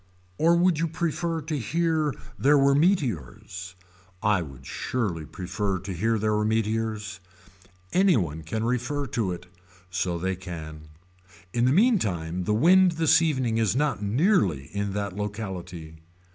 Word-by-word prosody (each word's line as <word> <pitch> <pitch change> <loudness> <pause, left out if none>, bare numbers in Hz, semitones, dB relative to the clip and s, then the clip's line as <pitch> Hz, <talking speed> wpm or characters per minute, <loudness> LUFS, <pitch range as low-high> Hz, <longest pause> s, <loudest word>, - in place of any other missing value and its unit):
Or 165 +2 +5
would 175 -2 +3
you 165 - +1
prefer 165 0 -2
to 155 -1 -2
hear 160 +3 0 0.2
there 145 +2 +5
were 140 0 +4
meteors. 95 - -1 0.5
I 105 -4 +3
would 70 -4 -10
surely 90 - -3
prefer 95 +1 -3
to 95 +1 -6
hear 110 +6 +1
there 105 0 +1
were 105 - +1
meteors. 110 -1 -1 0.7
Any 190 -2 +4
one 80 -5 -2
can 110 +8 -3
refer 125 +4 -1
to 110 -8 -1
it. 90 - -6 0.5
So 90 -1 -1
they 95 +2 -1
can. 80 -4 -8 0.7
In 120 0 +2
the 130 - +4
meantime 95 - +1
the 105 - +1
wind 180 - +5
this 160 0 +4
evening 130 -8 +1
is 110 -1 +1
not 140 -7 0
nearly 100 - +1
in 100 -1 -2
that 100 -2 -3
locality. 95 -6 -6
110 Hz, 145 wpm, -26 LUFS, 90-150 Hz, 0.7 s, Or